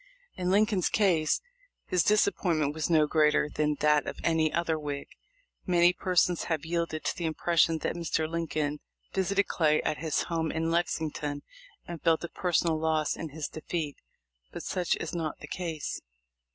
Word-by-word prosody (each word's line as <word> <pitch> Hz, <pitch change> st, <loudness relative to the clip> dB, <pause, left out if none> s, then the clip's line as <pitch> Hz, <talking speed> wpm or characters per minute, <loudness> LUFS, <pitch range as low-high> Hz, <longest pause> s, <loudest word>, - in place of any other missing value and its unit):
In 180 Hz, 0 st, -2 dB
Lincoln's 205 Hz, -1 st, +3 dB
case 175 Hz, -7 st, +2 dB, 0.4 s
his 180 Hz, -3 st, +2 dB
disappointment 170 Hz, -8 st, +2 dB
was 155 Hz, +1 st, -2 dB
no 155 Hz, -2 st, +5 dB
greater 150 Hz, -1 st, +3 dB
than 150 Hz, 0 st, 0 dB
that 150 Hz, 0 st, +3 dB
of -, -, -5 dB
any 160 Hz, -2 st, +2 dB
other 165 Hz, -2 st, 0 dB
Whig. 145 Hz, -2 st, -4 dB, 0.6 s
Many 175 Hz, 0 st, +5 dB
persons 180 Hz, -1 st, +1 dB
have 160 Hz, -3 st, -2 dB
yielded 165 Hz, -1 st, -2 dB
to -, -, 0 dB
the 175 Hz, -, -4 dB
impression 165 Hz, 0 st, +2 dB
that -, -, -2 dB
Mr. 165 Hz, -2 st, -1 dB
Lincoln 155 Hz, -3 st, -2 dB, 0.3 s
visited 195 Hz, +1 st, +1 dB
Clay 155 Hz, -2 st, +2 dB
at 150 Hz, -, -1 dB
his 160 Hz, -1 st, 0 dB
home 165 Hz, -2 st, -1 dB
in 165 Hz, +1 st, -1 dB
Lexington 155 Hz, -4 st, -1 dB, 0.4 s
and 170 Hz, -2 st, -7 dB
felt 165 Hz, 0 st, +2 dB
a 170 Hz, -, -4 dB
personal 170 Hz, -3 st, +1 dB
loss 155 Hz, -1 st, +1 dB
in 160 Hz, -, -6 dB
his 150 Hz, +1 st, -4 dB
defeat, 155 Hz, -2 st, -4 dB, 0.5 s
but -, -, -7 dB
such 180 Hz, -2 st, 0 dB
is -, -, -5 dB
not 160 Hz, -3 st, -3 dB
the 150 Hz, -, -10 dB
case. 165 Hz, -3 st, -4 dB
160 Hz, 165 wpm, -29 LUFS, 155-175 Hz, 0.6 s, no